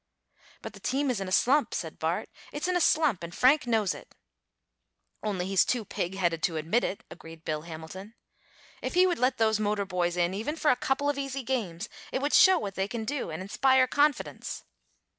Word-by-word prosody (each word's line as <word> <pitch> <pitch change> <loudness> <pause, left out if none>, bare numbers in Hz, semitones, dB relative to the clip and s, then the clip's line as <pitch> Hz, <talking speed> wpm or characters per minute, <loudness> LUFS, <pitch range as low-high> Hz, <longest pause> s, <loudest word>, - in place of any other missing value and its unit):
"But - - -7
the - - -12
team 270 +1 0
is 220 -6 -3
in 195 - -3
a - - -6
slump," 275 +9 +3
said - - -5
Bart. - - -1 0.2
"It's 290 +4 -3
in 365 - 0
a 355 - +2
slump, 300 - +3
and 170 0 -7
Frank 265 +1 +4
knows 220 -5 +2
it." - - -13 1.1
"Only 195 -4 -2
he's 190 -1 +3
too 240 -4 -1
pig 180 0 -3
headed 170 -4 0
to 165 -1 0
admit 165 +10 +1
it," 195 - -3
agreed 165 -1 -12
Bill 155 -1 -2
Hamilton. 170 +6 -9 0.7
"If - - -4
he 365 +1 +6
would 355 -6 0
let 255 +1 +2
those 220 -1 +2
motor 205 -1 0
boys 180 -2 -1
in 175 +1 +1
even 225 +10 -3
for 310 -2 +3
a - - +3
couple 270 +3 -1
of 290 -1 0
easy 275 -1 -4
games, 225 -7 -3 0.2
it - - -1
would 285 +2 -1
show 375 -3 +7
what 200 - -4
they 190 +1 -1
can 225 0 -4
do 280 -5 -3
and 160 +3 -5
inspire 260 +6 +3
confidence." 290 +2 0
220 Hz, 210 wpm, -28 LUFS, 180-275 Hz, 1.1 s, show